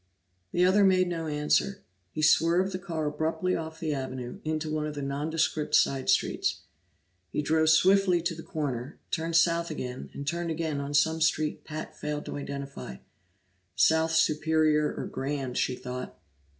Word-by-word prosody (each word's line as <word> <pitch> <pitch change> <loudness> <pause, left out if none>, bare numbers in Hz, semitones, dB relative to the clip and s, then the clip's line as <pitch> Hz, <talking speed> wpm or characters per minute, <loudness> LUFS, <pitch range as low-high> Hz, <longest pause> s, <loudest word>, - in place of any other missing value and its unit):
The 180 +1 +3
other 195 +3 +5
made 185 -1 +4
no 165 -2 -3
answer; 150 +6 0 0.3
he 155 - -4
swerved 170 +5 +4
the 185 - -4
car 165 -5 -3
abruptly 160 +4 -1
off 160 0 -5
the 155 -2 -1
avenue, 130 -3 -5
into 155 0 -2
one 155 0 -1
of 150 - -6
the 145 - -4
nondescript 150 +2 0
side 135 -1 +2
streets. 130 - +1 0.7
He 150 - -2
drove 160 +1 +3
swiftly 185 +2 +5
to 175 0 0
the 165 - -8
corner, 140 -4 -4
turned 165 0 -1
south 170 0 +3
again, 130 -5 -5
and 140 - -5
turned 170 +3 -2
again 160 -3 -2
on 140 +1 -4
some 160 +3 +3
street 155 -1 +1
Pat 155 0 -6
failed 150 0 -4
to - - -5
identify 140 - -6 0.8
South 160 0 +3
Superior 155 -1 +3
or - - -5
Grand, 135 -2 -3
she 125 - 0
thought. 125 0 -7
155 Hz, 165 wpm, -28 LUFS, 145-165 Hz, 0.8 s, other